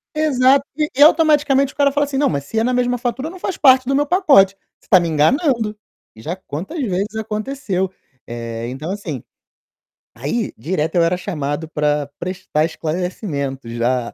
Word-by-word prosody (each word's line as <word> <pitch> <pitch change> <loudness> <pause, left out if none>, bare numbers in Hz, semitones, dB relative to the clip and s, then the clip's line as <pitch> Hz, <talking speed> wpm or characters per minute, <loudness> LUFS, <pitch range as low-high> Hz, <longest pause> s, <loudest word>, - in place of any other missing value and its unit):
Exato, 275 -2 +3
e 300 -2 -1
automaticamente 295 -4 +4
o - - -38
cara 280 -1 +3
fala 290 +1 +1
assim: 275 -1 -4
"Não, 290 - +3
mas 140 -2 -2
se 220 +10 -2
é - - +1
na 250 +2 +1
mesma 245 0 +1
fatura, 255 +5 -3
não 370 +2 -11
faz 375 - -3
parte 260 -3 +5
do 275 - +1
meu 290 +1 +2
pacote. 280 - +5 0.2
Você - - -28
tá 185 - +7
me 170 - -1
enganando", 220 - +1 0.4
já 155 +11 -5
quantas 190 - -7
vezes 205 -1 -2
aconteceu. 215 -3 -3 0.4
Eh, 115 0 -5
então, 145 +7 -5
assim, 175 - -5 0.9
aí 150 - -2
direto 155 +5 -2
eu 170 - +4
era 175 +2 +1
chamado 155 -4 -3
pra 150 -1 0
prestar 175 -4 -1
esclarecimentos 155 - -4
já 120 +1 -1
195 Hz, 170 wpm, -19 LUFS, -, 0.9 s, tá